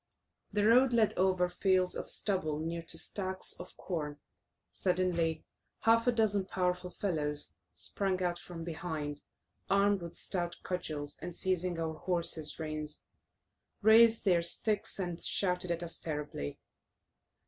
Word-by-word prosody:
The 205 0 +1
road 245 +3 +5
led 225 -3 +3
over 185 -1 +2
fields 185 0 +2
of - - -2
stubble 170 -7 0
near 165 +2 -3
to 165 0 0
stacks 185 +2 -1
of - - -10
corn. 150 -5 -4 0.5
Suddenly 175 -3 0 0.4
half 230 +1 +4
a - - +6
dozen 210 -4 +1
powerful 180 -1 -1
fellows 150 -7 +2 0.2
sprung 190 -2 -1
out 175 -1 -1
from 170 -2 -8
behind, 155 -3 -4 0.5
armed 200 0 +3
with 170 -1 -8
stout 175 -2 -1
cudgels, 150 -5 -4
and 175 0 -6
seizing 180 -2 0
our 160 -1 -2
horses' 165 -2 0
reins, 155 -1 -5 0.8
raised 225 +1 +6
their 175 -3 +4
sticks, 200 +5 0
and 175 -3 -4
shouted 180 -2 +2
at 170 0 -1
us 170 - -4
terribly. 150 - -4
180 Hz, 135 wpm, -32 LUFS, 160-195 Hz, 0.8 s, a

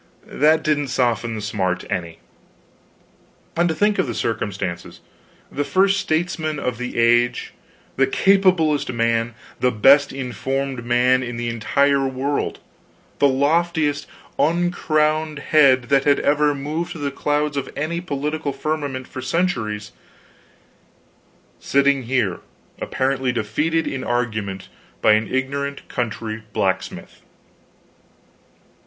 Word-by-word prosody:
That 155 +2 +2
didn't 145 -2 +1
soften 120 -3 0
the 110 - -5
smart 95 -3 -2
any. 85 -4 -3 1.4
And 170 +1 +2
to 160 - -1
think 210 +4 +2
of - - +1
the 120 - -4
circumstances! 95 -6 -3 0.5
the 145 - -1
first 195 +5 +2
statesman 160 -2 -1
of 125 -4 -3
the 125 - -5
age, 120 +1 +2 0.4
the 135 - +4
capablest 185 -8 +3
man, 115 -1 0 0.2
the 125 - +3
best 135 +6 +5
informed 135 0 -3
man 125 +2 +3
in 120 -1 -5
the 120 0 -2
entire 140 +4 +2
world, 135 +2 -2 0.6
the 140 - +5
loftiest 145 +2 +1 0.3
uncrowned 155 -2 +1
head 140 -3 +4
that 140 -1 +3
had 145 -1 +4 0.4
moved 155 +5 -3
through 160 - -9
the 140 -1 -1
clouds 150 +1 -1
of 140 - -3
any 165 +4 -2
political 150 -2 -3
firmament 140 -2 -3
for 130 - -7
centuries, 125 - -1 1.7
sitting 140 -1 +2
here 115 -8 0 0.4
apparently 130 -1 0
defeated 150 +9 0
in 135 -1 -3
argument 110 -6 -2 0.3
by - - +4
an 110 +1 +3
ignorant 140 +2 -2
country 110 -2 -3
blacksmith! 95 -1 -2
135 Hz, 115 wpm, -21 LUFS, 120-155 Hz, 1.7 s, best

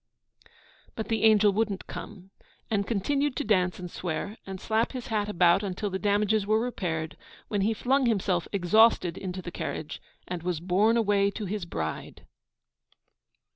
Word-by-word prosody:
But 220 - -5
the 225 -1 0
angel 210 -2 +5
wouldn't 205 -2 -1
come, 195 -2 -9 0.4
and 200 -2 0
continued 275 +6 0
to - - -1
dance 185 -4 +2
and 180 -2 -7
swear, 180 +4 -4
and 190 -1 -6
slap 225 +5 0
his 250 -2 -6
hat 210 -2 0
about 175 -1 +4
until 200 0 -3
the 190 - -2
damages 205 0 +1
were 215 +1 +3
repaired, 170 -10 -3 0.3
when 205 -2 0
he 220 +3 +1
flung 260 +3 +2
himself, 190 -6 +1
exhausted, 200 -2 +4
into 185 -1 -5
the 175 - -6
carriage, 155 - -5 0.3
and 180 -1 -4
was 175 -2 -2
borne 195 +7 +2
away 200 -3 +3
to 205 +1 -5
his 200 -1 -3
bride. 80 - -5
200 Hz, 160 wpm, -27 LUFS, 180-220 Hz, 0.4 s, angel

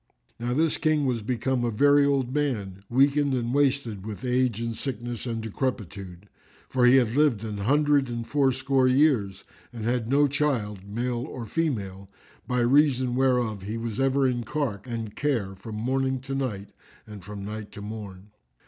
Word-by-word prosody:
Now 120 +1 -1
this 160 +1 +1
King 155 -2 +2
was 125 -3 0
become 125 +3 -1
a 120 - +1
very 145 +5 +4
old 135 -3 0
man, 105 -10 -2
weakened 140 +2 +3
and 120 -1 -2
wasted 135 -8 +1
with 110 +4 -7
age 125 -3 +1
and 115 -1 -3
sickness 120 -1 -5
and 115 -1 -3
decrepitude; 100 -6 -4 0.4
for 125 -2 +3
he 125 - +7
had 120 -4 +4
lived 135 -5 +2
an 105 -2 -4
hundred 145 +4 +2
and 115 -1 -4
fourscore 135 -1 +2
years 125 -8 +2 0.3
and 115 -3 -6
had 120 -1 0
no 145 +2 +4
child, 130 -8 -1
male 120 +3 -2
or 125 -4 -6
female, 100 - -2 0.4
by 125 -1 +1
reason 130 -1 +3
whereof 125 -6 +1
he 105 +4 -4
was 115 +1 -4
ever 135 0 +3
in 120 -2 -1
cark 120 -5 -3
and 115 -3 -5
care 120 -10 -1
from 105 +3 -9
morning 130 +4 0
to 135 +1 -6
night 110 -8 -3 0.4
and 105 -3 -10
from 100 +1 -7
night 105 0 -6
to 105 - -9
morn. 105 -2 -8
120 Hz, 170 wpm, -26 LUFS, 105-135 Hz, 0.4 s, he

